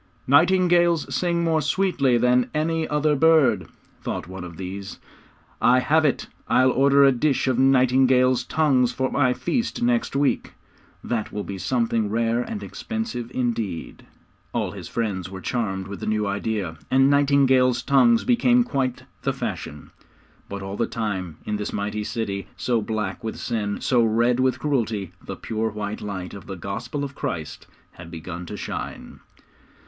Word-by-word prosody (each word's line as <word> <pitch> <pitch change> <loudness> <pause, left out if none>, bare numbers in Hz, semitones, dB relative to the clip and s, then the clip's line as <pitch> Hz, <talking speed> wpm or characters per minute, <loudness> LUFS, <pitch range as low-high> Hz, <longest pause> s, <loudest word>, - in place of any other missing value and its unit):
'Nightingales 175 +2 +3
sing 170 -1 0
more 160 -2 +2
sweetly 140 -5 +2
than 125 +1 +3
any 160 +1 0
other 150 0 +1
bird,' 135 - +4 0.3
thought - - -4
one 95 0 -7
of 85 -2 -9
these. 95 +1 -6 0.6
'I 125 +1 +5
have 155 +4 +3
it. 140 - +1 0.2
I'll 130 0 +4
order 140 +2 +4
a 135 - +7
dish 135 +2 +1
of 130 -1 +1
nightingales' 130 -1 +4
tongues 130 -6 +2
for 130 +1 -2
my 125 -3 +2
feast 235 +6 -2
next 240 - +1
week; 140 0 0 0.5
that 115 -3 -2
will 105 - -4
be 95 -1 -6
something 115 -2 0
rare 115 +2 +1
and 210 - -5
expensive 225 - -5
indeed!' 115 -9 -3 0.5
All - - -1
his - - -8
friends 100 -6 -3
were 95 0 -7
charmed 95 -2 -2
with 100 -1 -7
the - - -5
new 105 -1 0
idea, 100 -4 -2
and 135 +1 +4
nightingales' 135 -3 +3
tongues 230 - +4
became 245 0 +4
quite 135 - -2 0.2
the - - 0
fashion. 75 0 -6 0.6
But 100 -1 -5
all 95 +1 -5
the 115 - 0
time, 95 -8 -3
in 105 - -2
this 105 - -4
mighty 105 +1 -3
city, 105 -3 -3
so 120 -3 0
black 105 -2 -3
with 110 - -4
sin, 105 -4 -3
so 125 -2 +3
red 115 +2 +2
with 130 0 +2
cruelty, 110 - -1
the - - -6
pure 110 0 -2
white 105 0 -5
light 95 -3 -5
of 100 - -10
the 95 - -5
Gospel 115 - -5
of 140 -1 -5
Christ 80 - -5 0.2
had 85 -1 -12
begun 85 +1 -7
to - - -6
shine. - - -6
120 Hz, 160 wpm, -23 LUFS, 100-140 Hz, 0.6 s, a